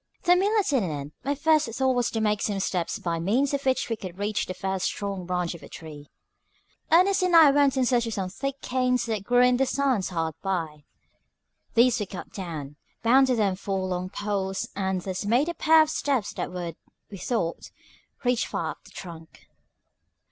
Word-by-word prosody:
THE 355 -1 +5
meal 400 +4 +2
at 390 - 0
an 270 -4 +3
end, 145 -1 -5
my 280 +2 0
first 310 -1 +3
thought 260 +2 +1
was 245 -1 +1
to 225 - -2
make 210 -1 +1
some 205 -2 -1
steps 180 -3 -1
by 170 -1 -2
means 245 +12 +1
of 280 0 -1
which 260 - +1
we 230 - -1
could 185 -4 -8
reach 205 +1 -1
the 185 - -5
first 190 0 -2
strong 195 -3 -4
branch 180 -1 -1
of 170 - -11
the - - -12
tree. 150 -3 -10 0.8
Ernest 370 +4 +5
and 365 -2 +2
I 315 -4 +9
went 280 -1 +3
in 260 - +3
search 240 -2 +2
of 225 - -3
some 185 -2 -3
thick 275 +5 -4
canes 250 -1 0
that 220 -4 -2
grew 245 +3 +4
in 250 0 +4
the 270 +1 +2
sands 265 -9 0
hard 165 -3 -2
by. 165 -6 -3 0.9
These 240 +1 +4
we 210 - -3
cut 185 - -8
down, 155 -7 -6 0.3
bound 260 +4 +5
them 215 -7 +1
to 190 - -18
four 195 -1 -2
long 180 0 -3
poles, 195 -1 -2
and 190 -1 -1
thus 185 +1 -4
made 245 +10 +2
a - - -2
pair 320 -1 +5
of 310 - -4
steps 260 -11 -1
that - - -4
would, 175 -2 -5 0.3
we 195 - -8
thought, 180 -9 -2 0.5
reach 245 -1 +1
far - - -2
up - - -13
the - - -14
trunk. 165 -3 -11
210 Hz, 205 wpm, -26 LUFS, 185-265 Hz, 0.9 s, I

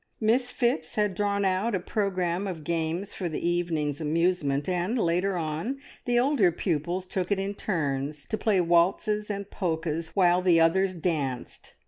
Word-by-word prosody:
Miss 240 +3 +2
Phipps 235 -11 0
had 210 -2 +1
drawn 200 +1 0
out 190 +4 +1
a - - 0
programme 185 -1 -1
of 170 -5 -5
games 170 +4 -2
for 180 -3 -3
the 160 +2 -2
evening's 165 -4 -1
amusement, 155 -3 +1
and 185 +6 0
later 180 -1 +1
on 165 - -2 0.3
the 245 -1 +2
older 245 -8 +4
pupils 175 +2 -2
took 185 0 -3
it 200 - +3
in 195 +1 -2
turns 145 -7 -2
to - - -2
play 215 -3 +2
waltzes 190 +5 +2
and 200 -1 -4
polkas, 165 -2 -2
while 180 -2 +4
the 175 -2 +4
others 185 +3 +3
danced. 150 -7 -3
180 Hz, 160 wpm, -27 LUFS, 165-200 Hz, 0.3 s, older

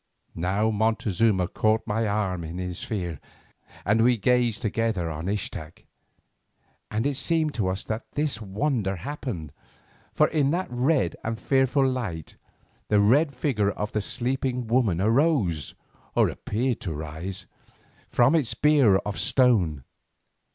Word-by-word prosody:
Now 95 +6 0
Montezuma 110 -3 +1
caught 110 +4 +1
my 110 +1 0
arm 95 -4 -1
in 80 +2 -6
his 90 -1 -4
fear, 90 - -4 0.7
and 110 +3 +3
we 125 0 +4
gazed 120 0 +1
together 110 -6 -1
on 80 +3 -5
Ixtac, 90 -6 -4 1.1
and 110 +3 -1
it 145 - +1
seemed 155 +2 +1
to 105 -5 -1
us 95 +1 -2
that 110 +1 -5
this 145 -6 -1
wonder 105 0 -1
happened. 95 - -5 0.6
For - - +3
in 145 -4 +2
that 180 +5 0
red 125 - +1
and 110 0 -3
fearful 135 0 +2
light 110 - -4 0.5
the 105 - +3
red 135 +8 +3
figure 120 -7 +1
of 105 +1 -4
the 105 - -1
sleeping 125 +2 -2
woman 115 -7 +1
arose, 110 - +1 0.4
or - - +4
appeared 120 +3 -2
to 85 -5 -4
rise, 80 +5 -6 0.6
from 120 +5 +4
its 150 -8 +2
bier 145 -9 +4
of 100 0 -4
stone. 95 - +2
110 Hz, 135 wpm, -25 LUFS, 95-130 Hz, 1.1 s, we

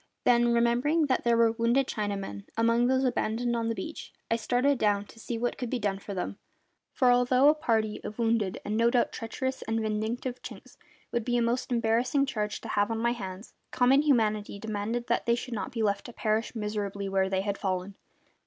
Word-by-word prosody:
Then, 240 -1 +4
remembering 240 +7 +2
that 260 -3 0
there 235 -1 +3
were 230 -1 +5
wounded 235 +4 +2
Chinamen 200 - -4
among 230 +1 +3
those 260 +1 +2
abandoned 240 -1 0
upon 230 -1 -1
the 230 - -1
beach, 320 +5 -7 0.2
I - - +4
started 250 +4 +1
down 205 -1 +2
to 225 - -16
see 230 +1 -4
what 240 +1 -2
could 245 - -3
be 255 - -1
done 200 -4 -1
for 200 0 -7
them; 185 +2 -4 0.5
for 250 -2 +3
although 250 +3 +5
a - - +6
party 220 -8 -1
of 210 - -7
wounded 225 -5 0
and 210 +1 -2
no 230 +1 +4
doubt 245 0 +2
treacherous 260 +4 -4
and 225 0 -1
vindictive 220 +4 -2
Chinks - - -11 0.4
would 235 - -1
be 245 +1 0
a - - +2
most 240 +2 -1
embarrassing 240 +4 +2
charge 210 -5 -3
to - - -8
have 205 +1 +1
on 225 - -1
my 235 +1 +1
hands, 195 -3 -7 0.2
common 260 +3 +4
humanity 215 -8 +1
demanded 220 +3 -3
that - - -1
they 235 - +4
should 245 +1 -6
not 215 - -4
be 230 -2 -2
left 200 -1 0
to 240 - -10
perish 220 +2 -1
miserably 205 -2 -3
where 190 0 +1
they 190 0 0
had 200 0 -3
fallen. 185 0 -2
230 Hz, 210 wpm, -28 LUFS, 210-245 Hz, 0.5 s, a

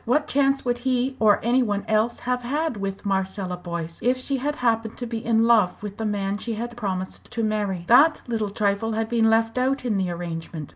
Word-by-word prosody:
What 295 +6 +1
chance 275 -1 +2
would 245 -1 0
he 255 +1 0
or 215 -2 +5
any 245 +3 +3
one 205 -4 -1
else 220 +2 +1
have 250 0 -1
had 290 +3 -1
with 195 0 -5
Marcella 190 -1 -1
Boyce, 170 -2 -6
if 250 +1 +2
she 270 +2 -2
had 290 +3 -2
happened 225 -4 0
to 245 - -4
be 230 -1 -4
in 225 -1 +3
love 215 -5 +3
with 205 -1 -6
the 220 - -2
man 200 -1 -2
she 230 0 -3
had 235 +2 -5
promised 190 -5 -4
to 230 - -3
marry? 205 -5 -1
That 300 +6 +6
little 225 -4 -2
trifle 205 +2 0
had 220 0 -1
been 230 -2 +3
left 225 +2 +2
out 265 +1 0
in 220 -5 +1
the 190 -2 0
arrangement. 165 -3 -5
225 Hz, 220 wpm, -24 LUFS, 200-245 Hz, -, That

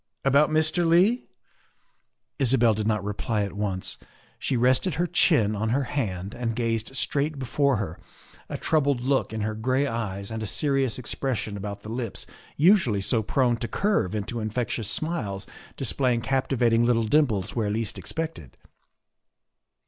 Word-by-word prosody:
"About 140 +2 +4
Mr. 155 +3 +2
Leigh?" 180 +9 +3 1.1
Isabel 120 -4 +4
did 105 0 -2
not 105 -3 0
reply 105 +1 -1
at 100 - -4
once. 100 -2 0 0.4
She 130 - -1
rested 130 +7 +2
her 175 - +1
chin 150 - +3
on 110 +2 -1
her 135 +4 +1
hand 100 -8 -3
and 115 -2 -3
gazed 115 +1 -1
straight 145 +3 -1
before 140 +1 +1
her, 95 -6 -4 0.5
a - - -3
troubled 145 -5 +1
look 135 -1 +1
in 110 -1 -3
her 110 +1 -1
gray 130 +6 0
eyes 105 -5 -4
and 110 0 -4
a 110 - -3
serious 135 -1 0
expression 120 -4 -3
about 100 0 -6
the 110 - -8
lips 115 -3 -3 0.3
usually 155 - +4
so 110 +4 +2
prone 120 +2 +1
to 120 - -4
curve 195 - 0
into 110 +3 -3
infectious 110 0 -2
smiles 105 - -2 0.3
display 130 -3 +1
ing 115 - -2
captivating 125 -3 +2
little 120 -1 +3
dimples 110 -6 +1
where 110 -3 0
least 110 0 -2
expected. 160 - -5
120 Hz, 155 wpm, -26 LUFS, 105-140 Hz, 1.1 s, About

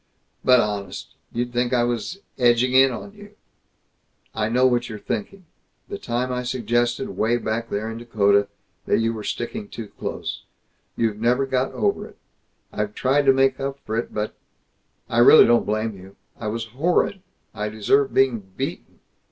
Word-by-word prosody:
"But 125 -1 +6
honest, 105 -4 -3 0.2
you'd 120 +1 -3
think 120 +1 0
I 120 -1 +3
was 120 - -3 0.2
edging 120 +1 +3
in 135 +1 +7
on 165 - -7
you!" 205 0 -14 1.0
"I 110 -1 -1
know 125 +2 +3
what 120 -1 +2
you 110 - -6
are - - -6
thinking. 180 - -5 0.4
The - - -5
time 125 +2 -2
I 125 0 -1
suggested, 120 0 -1
way 110 +5 +2
back 115 0 -3
there 105 +2 -2
in 115 0 -5
Dakota, 100 -3 +2 0.4
that - - +3
you 115 0 +1
were 110 -2 -6
sticking 205 - -4
too 115 - -8
close. - - -4 0.6
You've 110 -2 0
never 125 +4 +2
got 130 -1 0
over - - 0
it. - - -18 0.6
I've 105 0 -3
tried 135 +2 +2
to - - +9
make 135 0 +2
up 135 0 -3
for 110 - -3
it, 115 - -2
but 105 0 -3 0.7
I 120 -1 0
really 120 +6 +9
don't 120 0 +3
blame 110 0 -1
you. 95 +1 -14 0.2
I 110 - -6
was 115 +2 -3
horrid. 175 +6 +1 0.3
I 105 0 -3
deserve 120 +6 +2
being 130 -4 +3 0.2
beaten. - - -5
120 Hz, 175 wpm, -23 LUFS, 110-130 Hz, 1.0 s, to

